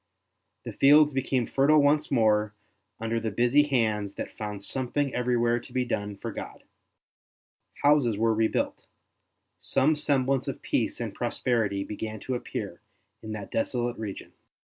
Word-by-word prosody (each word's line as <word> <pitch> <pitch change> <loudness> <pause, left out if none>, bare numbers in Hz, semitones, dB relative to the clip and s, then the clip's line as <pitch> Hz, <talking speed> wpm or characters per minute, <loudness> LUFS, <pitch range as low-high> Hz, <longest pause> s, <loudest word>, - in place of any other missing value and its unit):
The - - -7
fields 150 +1 +6
became 130 -2 0
fertile 145 +5 +4
once 150 +1 +3
more 110 -4 +2 0.4
under 115 +1 -1
the 115 0 -2
busy 120 +6 +3
hands 110 -7 0
that - - -6
found 105 -2 -5
something 135 +4 -2
everywhere 120 -1 +1
to - - -15
be 125 -1 0
done 105 -3 -3
for - - -5
God; - - -8 1.2
houses 140 -7 +4
were 115 +1 +2
rebuilt, 110 0 -1 0.7
some 150 +4 +2
semblance 135 -3 +1
of - - -5
peace - - -1
and - - -4
prosperity 105 -6 -1
began 110 +1 -6
to 130 - -4
appear 125 - -5 0.4
in 110 0 -6
that 105 -2 -7
desolate 120 +1 -1
region. 105 -3 -7
120 Hz, 140 wpm, -27 LUFS, 110-135 Hz, 1.2 s, fields